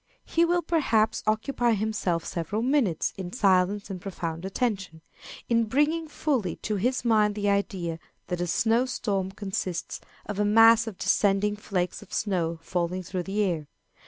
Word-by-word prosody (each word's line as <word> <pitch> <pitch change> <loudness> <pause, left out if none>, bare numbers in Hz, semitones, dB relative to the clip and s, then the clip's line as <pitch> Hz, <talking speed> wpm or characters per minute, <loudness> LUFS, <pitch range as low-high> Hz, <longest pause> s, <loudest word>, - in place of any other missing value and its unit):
He 335 +1 +2
will, 350 0 +1
perhaps, 225 -10 +1
occupy 235 +2 +1
himself 205 -5 -1
several 190 +6 -3
minutes 250 - +1
in 180 -2 -5
silence 200 -2 +2
and 185 -2 -6
profound 170 -3 -5
attention, 195 -6 -2 0.5
in 230 -1 +2
bringing 295 +7 +1
fully 275 - -1
to 210 -1 -1
his 250 +5 0
mind 210 -3 +3
the 205 -1 0
idea 190 -5 -1 0.3
that 180 -1 -3
a 175 - -1
snow 230 +8 +2
storm 195 -6 -1
consists 190 -3 -4 0.2
of 205 -1 -5
a - - +3
mass 225 +2 +6
of 210 -4 -6
descending 205 +1 +2
flakes 190 -2 -3
of 210 - -14
snow 175 -6 -1
falling 180 +1 -2
through 185 +1 -3
the 195 +4 -1
air. 165 -6 -1
205 Hz, 160 wpm, -27 LUFS, 185-225 Hz, 0.5 s, mass